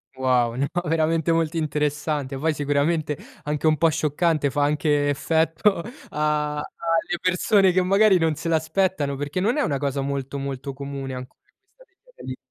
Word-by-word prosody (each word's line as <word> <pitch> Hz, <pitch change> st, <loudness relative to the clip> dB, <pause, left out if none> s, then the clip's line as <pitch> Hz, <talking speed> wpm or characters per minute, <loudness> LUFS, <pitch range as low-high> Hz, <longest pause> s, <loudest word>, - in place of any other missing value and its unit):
Wow, 125 Hz, -3 st, +1 dB
no, 140 Hz, +2 st, 0 dB, 0.2 s
veramente 165 Hz, +1 st, +1 dB
molto 165 Hz, 0 st, 0 dB
interessante, 150 Hz, -2 st, -1 dB
poi 160 Hz, +3 st, 0 dB
sicuramente 150 Hz, +2 st, 0 dB, 0.3 s
anche 150 Hz, +1 st, -1 dB
un 155 Hz, -1 st, +3 dB
po' 165 Hz, +1 st, +4 dB
scioccante, 155 Hz, -1 st, +1 dB
fa 145 Hz, +2 st, 0 dB
anche 145 Hz, 0 st, +1 dB
effetto 165 Hz, +6 st, +1 dB, 0.3 s
a 150 Hz, 0 st, 0 dB
alle 165 Hz, +3 st, -2 dB
persone 185 Hz, +1 st, +3 dB
che 185 Hz, +1 st, +2 dB
magari 195 Hz, +1 st, +5 dB
non 160 Hz, -2 st, +1 dB
se 165 Hz, +2 st, -4 dB
l'aspettano, 160 Hz, -2 st, 0 dB
perché 145 Hz, +5 st, -3 dB
non 225 Hz, +9 st, +1 dB
è 295 Hz, -, +2 dB
una 140 Hz, -, 0 dB
cosa 140 Hz, -1 st, -2 dB
molto, 140 Hz, 0 st, -3 dB
molto 135 Hz, 0 st, -5 dB
comune 140 Hz, -1 st, -6 dB
ancora, 125 Hz, 0 st, -9 dB, 0.4 s
questa -, -, -24 dB
degli -, -, -16 dB
anelli. -, -, -6 dB
150 Hz, 165 wpm, -23 LUFS, 140-165 Hz, 0.4 s, magari